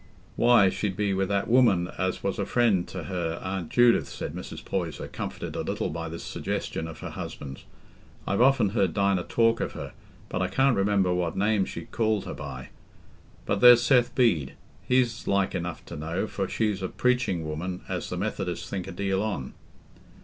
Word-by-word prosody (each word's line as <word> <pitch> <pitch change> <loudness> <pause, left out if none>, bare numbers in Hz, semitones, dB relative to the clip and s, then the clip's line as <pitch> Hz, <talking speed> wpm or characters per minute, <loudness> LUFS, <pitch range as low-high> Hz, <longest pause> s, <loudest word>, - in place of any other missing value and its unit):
"Why, 120 -5 +5
she'd 95 -2 -2
be 100 -2 +1
wi' 95 0 +1
that 100 0 -1
woman 110 -8 +4
as 95 0 -1
was 100 0 -1
a 100 - 0
friend 110 -7 +2
t' 95 -3 -6
her 85 0 -3
Aunt 95 -3 -3
Judith," 120 -1 +4
said - - -5
Mrs. - - -8
Poyser, 85 -5 -3
comforted - - -6
a - - -1
little - - -2
by 85 +1 -4
this 85 +1 -7
suggestion 80 - -3
of 80 - -9
her - - -6
husband. 65 -2 -7 0.6
"I've 100 - 0
often 125 -5 +4
heard 95 -4 0
Dinah 100 -2 +2
talk 115 0 +2
of - - -2
her, - - -7 0.3
but 90 - -3
I 95 - +1
can't 130 +7 +3
remember 95 -2 +2
what 90 -2 -1
name 105 0 +2
she - - -6
called 110 -3 0
her - - -5
by. 70 -3 -7 0.8
But 100 - -1
there's 120 -1 +9
Seth 125 -1 +3
Bede; 95 - +2 0.3
he's 125 -3 +1
like 100 -1 +1
enough 85 -1 -4
to - - -8
know, 80 +6 -2
for 100 -3 -3
she's 105 -3 0
a 95 - -1
preaching 120 -9 0
woman 90 +4 -4
as - - -3
the - - -4
Methodists - - -3
think 95 -3 -4
a - - -5
deal 95 +2 -1
on." 100 -12 -3
95 Hz, 190 wpm, -27 LUFS, 90-115 Hz, 0.8 s, there's